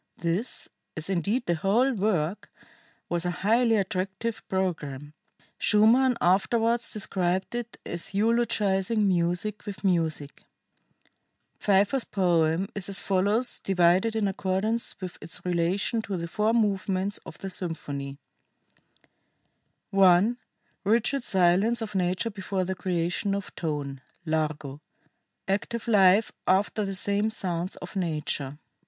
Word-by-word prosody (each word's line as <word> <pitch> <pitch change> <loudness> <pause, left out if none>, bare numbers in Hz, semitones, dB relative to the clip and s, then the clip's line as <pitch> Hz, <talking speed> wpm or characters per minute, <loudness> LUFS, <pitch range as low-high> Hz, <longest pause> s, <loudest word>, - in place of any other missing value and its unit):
This, 175 +8 -2 0.3
as 155 +5 -2
indeed 200 +8 0
the 175 - +1
whole 215 +11 +2
work, 195 -4 -1 0.6
was 170 -1 -1
a 180 - 0 0.2
highly 230 +1 +4
attractive 195 +2 -2
programme 150 -7 -3 0.5
[Schumann 235 +4 +4
afterwards 230 +6 +2
described 185 -2 -1
it 240 -1 -5
as 170 0 -4
'eulogizing 210 -2 +2
music 180 +3 0
with 200 -1 -6
music']." 160 -6 -1 1.2
Pfeiffer's 205 +6 +3
poem 175 -1 +1
is 200 -2 -2
as 195 - +3
follows, 205 +6 +2
divided 185 +4 +2
in 215 -2 +1
accordance 195 +4 -1
with 185 -2 -7
its 165 +3 -6
relation 180 +6 0
to 200 -3 -4
the 170 0 -4
four 210 +6 +1
movements 200 -3 0
of - - -10
the 195 - -6
symphony: 145 -6 -4 1.8
[I. 195 +4 +5 0.5
RIGID 235 +6 +1
SILENCE 190 +4 +3
OF 215 - -6
NATURE 185 +4 0
BEFORE 190 -1 -3
THE 185 +1 -2
CREATION 180 +2 -1
OF 200 - -6
TONE: 145 -4 -4 0.2
Largo. 155 -3 -2 0.7
ACTIVE 210 +4 -2
LIFE 205 -1 +5 0.2
AFTER 200 +3 +2
THE 195 0 -4
SAME. 205 +3 +1
SOUNDS 180 -4 -2
OF - - -10
NATURE. 150 -5 -2
190 Hz, 120 wpm, -27 LUFS, 175-215 Hz, 1.8 s, I